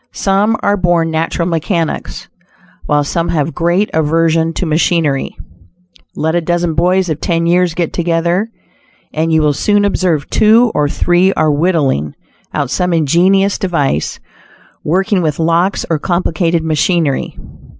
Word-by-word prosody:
Some 205 +3 +1
are 205 0 +2
born 175 -3 +1
natural 165 +1 -1
mechanics, 165 0 -3 0.6
while 150 0 +2
some 165 +4 -2
have 160 0 -1
great 175 +4 +1
aversion 160 +1 +1
to 180 - -3
machinery. 155 -3 0 0.8
Let 160 +1 -1
a 175 - +1
dozen 175 0 -1
boys 180 +4 +1
of 155 -2 -3
ten 170 -1 0
years 175 0 +1
get 170 -2 -2
together, 175 +4 0 0.6
and 160 +1 -1
you 160 -1 +2
will 150 -1 +2
soon 205 +7 +1
observe 180 -7 0
two 225 +2 +4
or 145 -1 0
three 175 +5 +2
are 155 -1 +1
"whittling" 145 - 0 0.4
out - - -2
some 180 -1 0
ingenious 180 +6 +2
device; 145 - -1 0.6
working 190 +4 0
with 155 -4 -1
locks 170 +4 0
or 160 -2 -1
complicated 170 -1 -1
machinery. 160 -1 0
170 Hz, 140 wpm, -14 LUFS, 160-180 Hz, 0.8 s, two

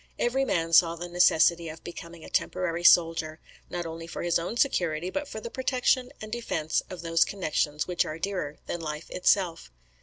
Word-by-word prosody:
Every 265 +3 +1
man 165 -7 -1
saw 165 0 +6
the 175 +1 -6
necessity 170 -1 +3
of 155 - -10
becoming 170 -1 -9
a - - -10
temporary 175 -2 -1
soldier, 165 -2 +4 0.3
not 175 -1 -4
only 165 0 -7
for - - -6
his 175 -1 +2
own 175 +8 -4
security, 175 - 0
but 290 +5 -3
for 220 - -6
the 230 +2 -7
protection 255 -1 +1
and 215 0 -8
defence 215 -9 -1
of 185 -2 -8
those 165 0 +3
connexions 155 -5 -1
which 180 -1 +1
are 155 - -6
dearer 175 -5 -3
than 175 - -4
life 150 0 -6
itself. 180 - +1
170 Hz, 185 wpm, -27 LUFS, 165-190 Hz, 0.3 s, saw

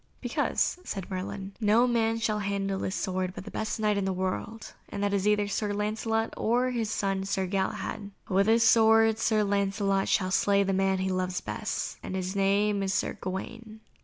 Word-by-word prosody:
"Because," - - 0
said 195 - -6
Merlin, 190 +1 -5
"no 220 +3 +4
man 225 -2 +1
shall 215 -2 0
handle 195 -1 -2
this 190 - -2
sword 185 0 -2
but - - -8
the - - -8
best 220 +1 -3
Knight 210 -1 +1
in 195 - -1
the 190 - 0
world, 190 +4 -4 0.2
and 200 - -4
that 205 0 +1
is 200 0 +1
either 210 -1 +2
Sir 205 +1 -1
Lancelot 220 +2 -1
or 245 +3 +1
his 230 -3 -2
son 195 -2 -1
Sir 195 -1 -1
Galahad. 195 +2 -3 0.2
With 195 +2 +2
this 230 +1 +5
sword 225 -1 +5
Sir 215 -2 +2
Lancelot 200 -1 0
shall 185 -2 +1
slay 200 +1 +3
the 195 0 0
man 190 0 +2
he 190 0 -1
loves 185 0 -1
best, - - -4
and 190 - -5
his 185 +1 -3
name 200 +1 +2
is 195 -1 -1
Sir - - 0
Gawaine." 220 +4 -6
200 Hz, 190 wpm, -28 LUFS, 190-220 Hz, 0.2 s, this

